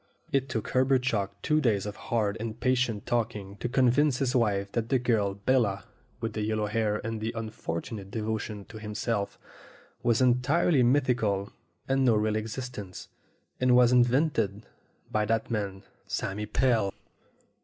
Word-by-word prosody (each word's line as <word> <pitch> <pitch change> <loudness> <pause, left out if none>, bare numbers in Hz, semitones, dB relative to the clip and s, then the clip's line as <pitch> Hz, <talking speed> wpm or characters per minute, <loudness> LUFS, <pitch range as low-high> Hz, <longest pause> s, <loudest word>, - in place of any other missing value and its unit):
It 135 -2 +1
took 115 -4 -3
Herbert 130 0 +3
Chalk 100 -5 -1
two 155 0 +2
days 105 -7 +1
of 105 0 -5
hard 110 -3 -1
and 115 0 -5
patient 125 -5 +1
talking 105 -4 -2
to 120 - -3
convince 130 +2 +3
his 135 -1 0
wife 100 -4 +1
that 115 -1 -2
the 135 - +4
girl 110 -5 +1
Bella, 100 -3 +1 0.4
with 115 -1 -3
the 110 - -3
yellow 110 0 0
hair 105 0 0
and' 115 -1 -3
the 110 +1 -1
unfortunate 105 -2 -5
devotion 105 -1 -3
to 110 - -9
him 105 -1 -7
self, 105 -2 -2 0.6
was 120 -2 +2
entirely 130 +5 +3
mythical, 120 -6 +1 0.3
had 135 0 +2
no 125 -4 +4
real 105 0 +1
existence, 110 -3 -5 0.5
and 125 -1 +4
was 125 -1 +6
invented 120 -4 +2 0.5
by 110 - +1
that 115 +1 +1
bad - - -13
man, 100 -3 -3 0.2
Sammy 105 +2 -3
Pell. 115 -5 +1
115 Hz, 155 wpm, -28 LUFS, 105-125 Hz, 0.6 s, was